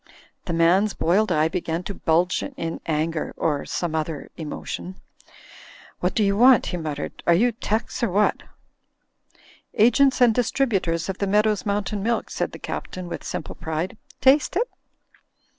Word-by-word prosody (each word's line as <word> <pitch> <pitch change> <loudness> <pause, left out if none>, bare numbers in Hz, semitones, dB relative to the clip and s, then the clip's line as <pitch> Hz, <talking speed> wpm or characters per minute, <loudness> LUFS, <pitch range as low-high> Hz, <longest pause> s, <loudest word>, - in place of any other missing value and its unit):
The 170 - -3
man's 180 +5 +3
boiled 190 +4 +2
eye 155 -1 +3
began 170 0 -3
to 200 - -5
bulge 175 +1 +1
in 165 - -5
anger— 160 0 -1
or 150 -3 0
some 175 -3 -2
other 155 -1 -3
emotion. 170 +3 -6 1.0
'What - - -1
do 220 - +3
you 200 0 +2
want?" 250 +2 +6
he 180 - -3
muttered, 155 -3 -5
"are 170 - +6
you 240 +7 +3
'tecs 225 +2 -3
or 235 - +1
what?" 205 +3 +2 1.3
"Agents 260 +5 +4
and 245 -3 +6
Distributors 215 -10 0
of 195 -1 -4
the 200 - 0
Meadows' 210 0 +2
Moim 200 0 0
tain 210 -2 -3
Milk," 235 +3 -1
said - - -2
the - - -9
Captain, 185 -1 -6
with - - -6
simple - - -5
pride, 160 +3 -4 0.3
"taste 270 +4 +4
it?" 470 +6 +1
190 Hz, 160 wpm, -23 LUFS, 165-220 Hz, 1.3 s, want